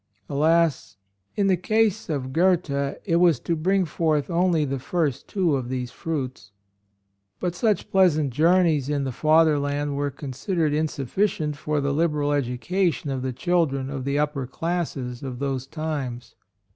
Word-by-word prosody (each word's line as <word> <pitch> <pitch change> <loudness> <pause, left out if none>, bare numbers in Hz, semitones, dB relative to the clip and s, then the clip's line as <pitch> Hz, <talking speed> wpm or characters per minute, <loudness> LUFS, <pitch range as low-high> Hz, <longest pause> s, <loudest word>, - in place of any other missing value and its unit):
Alas! 150 - +1 0.4
in 200 - +1
the 190 -1 +4
case 215 +3 +1
of 130 -4 -3
Goethe 180 -1 +2 0.3
it 170 -4 +2
was 170 -7 +4
to 170 - -1
bring 185 +4 +1
forth 155 -1 0
only 170 -2 +2
the 135 -1 -3
first 145 -1 -1
two 180 -7 +1
of 125 -3 -3
these 125 -1 -3
fruits. 130 -10 -5 0.9
But 175 - -1
such 210 +3 0
pleasant 155 -7 +3
journeys 160 -2 +3
in 145 -1 0
the 135 - -2
Fatherland 145 -1 +2
were 145 0 -1
considered 145 +4 -2
insufficient 150 - -1
for 150 +1 -2
the 140 0 0
liberal 150 -2 +1
edu 125 -4 -1
cation 180 -3 0
of 130 -1 -2
the 130 0 -2
children 140 -2 0
of 135 -2 -4
the 140 +2 -1
upper 145 -3 -1
classes 135 -5 -3
of 130 -3 -5
those 135 -1 -3
times. 140 -6 -4
150 Hz, 155 wpm, -24 LUFS, 135-170 Hz, 0.9 s, the